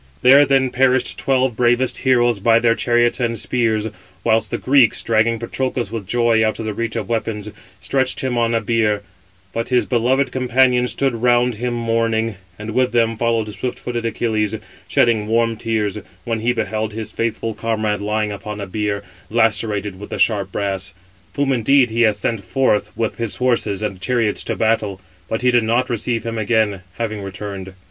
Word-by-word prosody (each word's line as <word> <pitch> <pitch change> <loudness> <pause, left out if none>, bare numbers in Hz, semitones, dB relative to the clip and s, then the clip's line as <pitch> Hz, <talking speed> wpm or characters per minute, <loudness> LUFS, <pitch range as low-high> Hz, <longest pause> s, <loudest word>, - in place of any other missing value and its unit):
There 140 +3 +7
then 135 -2 +2
perished 130 0 +2
twelve 130 -3 +1
bravest 120 +2 +1
heroes 120 -4 +2
by 115 +3 +4
their 115 0 +3
chariots 120 +1 +2
and 115 -2 -1
spears, 110 -1 0 0.4
whilst 110 -1 +2
the - - -2
Greeks, 130 -4 +3
dragging 115 +1 +2
Patroclus 120 0 -3
with 110 -5 -5
joy 115 -1 +2
out 110 0 0
of 110 - -5
the 110 - -2
reach 115 +1 -3
of 110 -4 -3
weapons, 110 -2 -3 0.3
stretched 130 +4 -1
him 130 -2 -1
on 115 -1 +1
a 115 - +1
bier; 110 -2 +1 0.5
but 115 +1 -3
his 125 -1 +2
beloved 130 +3 +1
companions 125 -1 +2
stood 135 -2 0
round 120 +1 +2
him 120 +2 -3
mourning, 115 -2 0 0.2
and 105 +1 -6
with 125 +1 +1
them 115 -1 +2
followed 115 -1 0
swift 105 +5 -4
footed 120 -1 -4
Achilles, 110 -2 -1 0.3
shedding 110 -3 +2
warm 115 +1 +1
tears, 110 -2 -2 0.2
when 115 -1 -2
he 115 +3 +1
beheld 110 -2 -2
his 110 -1 -5
faithful 115 0 -2
comrade 110 -2 -1
lying 105 0 -1
upon 105 +1 -6
a 100 - -4
bier, 100 +1 -2 0.3
lacerated 105 -3 +1
with 105 - -9
the - - -4
sharp 100 -4 +1
brass: 95 -1 -3 0.4
whom 140 -1 +1
indeed 125 +1 +3
he 115 +1 0
had 110 -2 +4
sent 115 -4 -2
forth 130 -6 +1
with 115 -2 -2
his 115 -3 -2
horses 120 -5 0
and 95 -3 -4
chariots 115 0 0
to - - -2
battle, 110 -3 0 0.3
but 110 - -2
did 120 -2 +3
not 120 +3 +1
receive 115 0 -1
him 115 0 -3
again, 110 -3 +1 0.2
having 110 -3 -3
returned. 95 -1 -7
115 Hz, 180 wpm, -19 LUFS, 105-120 Hz, 0.5 s, There